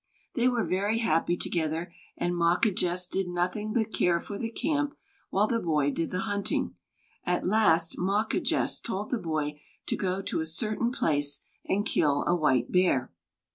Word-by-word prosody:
They 245 -2 +2
were 245 -3 +2
very 200 +4 0
happy 175 -5 +1
together 165 +1 -2 0.2
and 175 0 0
Mawquejess 175 +1 +2
did 190 0 -1
nothing 180 +5 -1
but 220 -1 0
care 170 -1 +2
for 200 +3 -7
the 225 - -2
camp, 290 +4 -1 0.3
while 200 +2 +3
the 230 +1 0
boy 150 -6 +1
did 165 +3 -2
the 185 - -2
hunting. 205 -2 -1 0.5
At 180 0 0
last 175 -5 +3
Mawquejess 200 +4 +1
told 210 -2 -4
the 245 - 0
boy 155 -4 -2 0.2
to - - -1
go 190 0 -2
to - - -1
a 160 - -1
certain 215 +7 0
place 145 - +1 0.2
and 205 +2 0
kill 145 -2 +2
a 175 - +3
white 130 -7 +2
bear. 180 -9 +2
180 Hz, 165 wpm, -28 LUFS, 165-215 Hz, 0.5 s, while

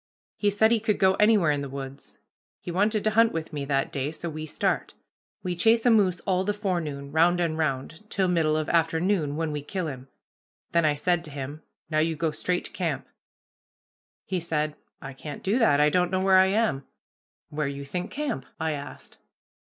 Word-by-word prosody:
He 205 - +1
said 220 +2 +3
he 230 - +4
could 215 -1 0
go 190 0 +4
anywhere 210 -7 +5
in 145 -1 -1
the 140 - -5
woods. 135 0 -8 0.4
He 175 - -6
wanted 210 +4 +1
to 215 - +2
hunt 225 +1 +4
with 165 -1 -4
me 145 -2 -3
that 135 -1 0
day, 140 +1 -2
so 160 +1 -5
we 155 0 -6
start. - - -1 0.5
We 180 -1 -2
chase 225 +6 +3
a 245 - +6
moose 190 -5 +3
all 185 -1 +1
the 205 +1 -1
forenoon, 160 -9 -3
round 170 +3 +4
and 165 -2 0
round, 160 +6 -3
till 190 -1 +1
middle 160 -3 +2
of 155 -1 -2
afternoon, 165 -2 +1
when 160 0 -1
we 150 -1 -3
kill 185 +5 -4
him. 135 -4 -6 0.6
Then 170 -1 +3
I 150 -1 +3
said 175 +3 +1
to - - -8
him, 145 +2 -6 0.3
'Now 155 - +2
you 160 +1 +1
go 160 +1 0
straight 180 +4 -2
to - - -6
camp.' - - -3 1.2
"He 185 - -1
said, 155 -2 -1 0.3
'I 135 -1 -7
can't 145 +2 -8
do 210 +6 +1
that. 180 - +4
I 150 0 +4
don't 180 +1 +2
know 185 0 0
where 190 -1 +5
I 190 - +6
am.' 200 -9 +1 0.7
"'Where 150 -1 -2
you 140 0 -5
think 180 +7 -4
camp?' 280 - -3
I 160 -1 0
asked. 145 -1 -8
165 Hz, 205 wpm, -26 LUFS, 150-190 Hz, 1.2 s, a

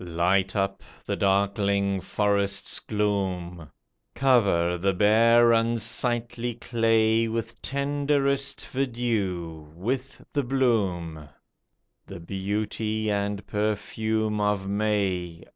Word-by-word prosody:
Light 90 +3 +1
up 95 -1 -1 0.2
the - - -1
darkling 100 0 +1
forest's 100 0 0
gloom; 95 -6 -2 0.5
Cover 100 -10 +3
the 95 +1 +1
bare, 115 +4 +5
unsightly 115 +1 0
clay 115 -1 +2
With 115 0 -4
tenderest 140 0 0
verdure, 110 - -2
with 130 +9 -4
the 145 - +1
bloom. 95 - -1 0.8
The - - -8
beauty 105 +4 -2
and 100 0 -2
perfume 110 +1 -1
of 105 -2 0
May 100 -5 -1
105 Hz, 90 wpm, -26 LUFS, 95-115 Hz, 0.8 s, bare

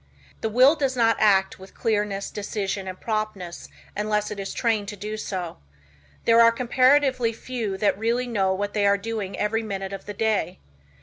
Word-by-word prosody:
The 220 - -1
will 255 +6 +6
does 270 -4 -1
not 230 -1 +4
act 195 -3 +3
with 190 +1 -14
clearness, 205 -3 -1
decision 200 -2 -3
and 185 0 -7
promptness 215 -6 -4 0.3
unless 210 0 -1
it 210 - -5
is 195 - -4
trained 220 -4 0
to 205 - -5
do 210 +2 -5
so. 185 -5 -5 0.7
There 230 0 +6
are 230 0 +7
comparatively 255 0 +3
few 225 -4 -4
that 200 0 +1
really 235 +3 0
know 200 -6 0
what 200 +2 -2
they 205 -1 +2
are 200 0 +4
doing 210 -2 -4
every 225 +2 0
minute 195 -3 -5
of 195 - -8
the 205 - -6
day. 200 -5 0
210 Hz, 180 wpm, -24 LUFS, 195-230 Hz, 0.7 s, are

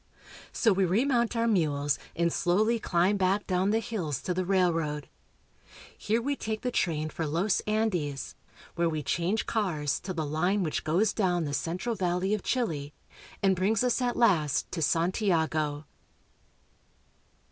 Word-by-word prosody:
So 225 -4 +3
we 190 +1 +1
remount 235 +6 +1
our 230 0 +1
mules 145 -8 +1 0.2
and 170 0 +1
slowly 215 +6 +2
climb 185 0 +2
back 195 +2 +1
down 185 +1 +1
the 220 - +2
hills 200 - -3
to 180 - -1
the 185 +1 -1
railroad. 165 -6 0 0.9
Here 220 +2 0
we 280 +4 -1
take 220 -4 -4
the 250 - -2
train 155 -7 -1
for 160 - -3
Los 175 +7 +1
Andes, 180 -11 -1 0.4
where 170 -1 +1
we 155 -2 -3
change 180 +9 0
cars 160 -10 -1
to 185 - -6
the 160 -4 -2
line 180 +7 0
which 155 - -2
goes 185 +7 +2
down 180 -5 +1
the 145 - -4
central 180 - -2
valley 185 0 0
of 210 - -1
Chile 155 - -2 0.5
and 190 -1 +4
brings 200 +5 +1
us 250 0 +1
at 245 -1 0
last 165 - +2
to 165 - -3
Santiago. 160 -3 0
185 Hz, 155 wpm, -28 LUFS, 160-215 Hz, 0.9 s, and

